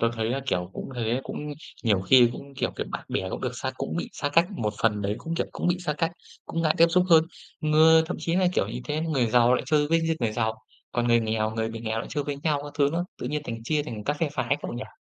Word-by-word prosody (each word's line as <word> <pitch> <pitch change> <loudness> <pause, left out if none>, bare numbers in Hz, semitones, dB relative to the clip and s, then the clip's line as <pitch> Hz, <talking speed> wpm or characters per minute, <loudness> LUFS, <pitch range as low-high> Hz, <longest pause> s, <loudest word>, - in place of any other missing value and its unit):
Tớ 115 - +3
thấy 110 0 -1
là, 135 +2 -1
kiểu, 90 -6 -1
cũng - - -6
thế, 120 +2 0
cũng 150 0 -5 0.3
nhiều 105 -4 +3
khi 120 +5 +6
cũng, 140 +2 -10
kiểu, - - -1
kiểu - - -3
bạn - - -5
bè 95 - -2
cũng - - -4
được 125 - -1
xa 130 +1 -3
cũng 135 +5 -3
bị - - -3
xa 145 -9 -2
cách, 165 +4 +4
một 110 - -2
phần 105 -2 +2
đấy 100 +1 0
cũng, 165 0 -4
kiểu, - - -1
cũng - - -3
bị 175 0 +1
xa 150 - +1
cách, 165 +3 -1 0.3
cũng 165 0 -2
ngại 155 -1 +3
tiếp 165 - +8
xúc 180 +1 +4
hơn. 160 -1 +7 0.4
Người 160 +1 +6
thậm 180 - -3
chí 170 +1 0
là, 185 -1 +3
kiểu, - - +1
những - - -5
cái 150 +1 -2
người 155 -7 +1
giàu 120 +2 +4
lại - - 0
chơi 150 0 +3
với 165 +1 +3
những 165 0 0
người 115 -3 0
giàu, 110 +1 0 0.4
còn 120 0 0
người 115 0 +5
nghèo 110 -1 0
người 110 0 -2
bị 115 0 -6
nghèo 110 0 -2
lại 115 - -4
chơi 145 -3 -2
với 145 -1 -3
nhau 150 -3 +1
các 145 - -8
thứ 140 -1 +4
nữa. 175 +1 0
Tự 125 - -4
nhiên 150 +1 -2
thành 115 -3 -5
chia 150 +4 +1
thành 115 -8 -7
các 145 - 0
phe 165 - +2
phái 130 -1 0
cậu - - -4
nhỉ? 120 +2 -8
140 Hz, 290 wpm, -26 LUFS, 115-160 Hz, 0.4 s, tiếp